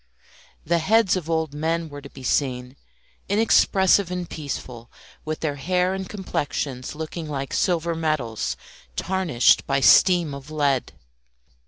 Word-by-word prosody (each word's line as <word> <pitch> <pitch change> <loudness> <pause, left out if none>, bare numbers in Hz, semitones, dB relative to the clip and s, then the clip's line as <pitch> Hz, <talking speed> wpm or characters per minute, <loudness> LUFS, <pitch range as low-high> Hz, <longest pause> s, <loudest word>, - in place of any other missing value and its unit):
The 170 +2 +2
heads 205 +4 +3
of 170 -3 -4
old 160 -3 -1
men 165 +2 -1
were 145 -1 -9
to 140 - -11
be 135 - -12
seen, 125 -1 -1 0.5
inexpressive 200 -3 +3
and 180 -1 -4
peaceful, 125 -6 -7 0.4
with 155 0 -4
their 145 -3 -2
hair 180 +5 0
and 190 -1 -5
complexions 145 -9 -4
looking 160 +1 -6
like 140 -2 -4
silver 170 -2 +1
medals 155 -9 -2 0.4
tarnished 180 -10 +2
by 135 0 +1
steam 175 +1 +5
of 140 +1 -9
lead. 145 -5 0
155 Hz, 135 wpm, -23 LUFS, 140-180 Hz, 0.5 s, steam